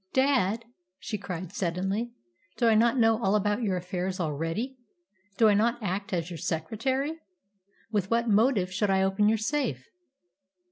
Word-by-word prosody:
"Dad," 245 -5 +2 0.3
she 210 +1 -5
cried 185 -2 -6
suddenly, 195 +6 -1 0.5
"do 235 - +3
I 225 - +5
not 230 +3 +4
know 225 -1 +3
all 195 +2 +3
about 210 +2 +1
your 195 -5 0
affairs 180 +1 -3
already? 165 - -2 0.6
Do 225 - +6
I 210 - +5
not 230 +4 +2
act 200 -1 -3
as 175 -1 -2
your 165 - -6
secretary? 260 - -2 0.7
With 200 -3 0
what 235 +1 +1
motive 210 -3 +3
should 205 +1 0
I 190 0 +3
open 195 +2 +3
your 225 - +3
safe?" 285 - -2
210 Hz, 155 wpm, -28 LUFS, 185-230 Hz, 0.7 s, Do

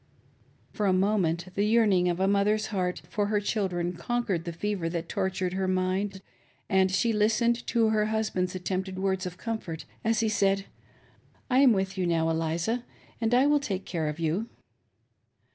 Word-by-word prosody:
'" - - -35
For 210 - 0
a 190 - +4
moment 185 -3 +1
the 200 - 0
yearning 210 -5 +3
of 175 0 -1
a 190 - +2
mother's 205 +2 +2
heart 180 -2 -1
for 205 -1 -1
her 210 0 +1
children 185 -4 -1
conquered 190 -2 -2
the 170 - -3
fever 180 0 -2
that 165 0 -4
tortured 190 -1 -1
her 190 0 -1
mind, 190 +1 -1 0.4
and 190 0 +3
she 230 +4 +2
listened 225 +3 +2
to 230 -2 +2
her 215 -1 +2
husband's 215 -4 -1
attempted 185 +1 -3
words 190 -1 -1
of 180 0 -8
comfort, 210 -9 -5 0.2
as 225 0 +2
he 225 - +1
said, 195 -2 +1 0.9
"I 255 - +5
am 270 -2 +7
with 190 -2 -1
you 180 - +1
now 165 -1 +1
Eliza, 165 +9 -1 0.4
and 225 0 +1
I 255 +2 +5
will 295 0 +4
take 195 -9 -4
care 160 -3 -2
of 150 +2 -4
you." 170 +8 -1
190 Hz, 180 wpm, -28 LUFS, 180-215 Hz, 0.9 s, am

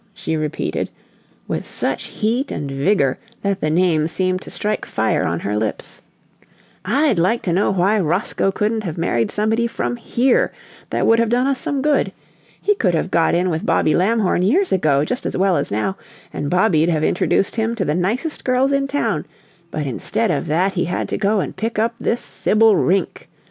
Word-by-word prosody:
she 160 - -3
repeated, 155 -1 -2 0.6
with - - -2
such - - -2
heat 235 +6 -1
and 140 -2 -4
vigor 140 -1 +1 0.2
that 200 -1 -1
the 155 - +1
name 160 -2 +2
seemed 185 +2 -1
to - - -9
strike 210 0 -2
fire - - 0
on - - -1
her 105 - -2
lips. 105 0 -3 0.8
"I'd 240 - +2
like 220 +8 +1
to 175 - 0
know 190 +4 +2
why 195 +3 +2
Roscoe 185 +3 0
couldn't 215 +2 -1
have 170 -4 -5
married 120 -9 0
somebody 225 +3 +1
from 120 - -3
HERE 250 - +1 0.4
that - - 0
would 230 0 +4
have 230 -1 +2
done 245 +2 +2
us 275 -1 0
some 275 -2 -2
good! 300 -1 +2 0.5
He 415 - +2
could 190 - +1
have 175 +3 -1
got 165 0 +3
in 180 +1 +1
with 160 0 -2
Bobby 155 - +2
Lamhorn 200 -1 +2
years 330 - +2
ago 150 -6 +2
just 250 - -3
as - - -3
well 190 -1 +3
as 140 - -1
now, 110 - -1 0.4
and 145 - -3
Bobby'd 175 -3 +3
have 155 -2 +1
introduced 180 +2 +1
him 225 +1 0
to 195 -5 -1
the 150 - 0
nicest 220 - -2
girls 255 +2 +2
in 275 0 +1
town, 285 +1 -1 0.4
but 155 -3 -3
instead 185 - -1
of - - -2
that 180 +6 +1
he 175 -1 0
had 175 - -2
to - - -1
go 205 0 +2
and - - -5
pick 225 +3 -3
up 225 +2 +1
this 235 - -1
Sibyl 220 0 +3
Rink! 190 0 0
190 Hz, 195 wpm, -20 LUFS, 165-230 Hz, 0.8 s, would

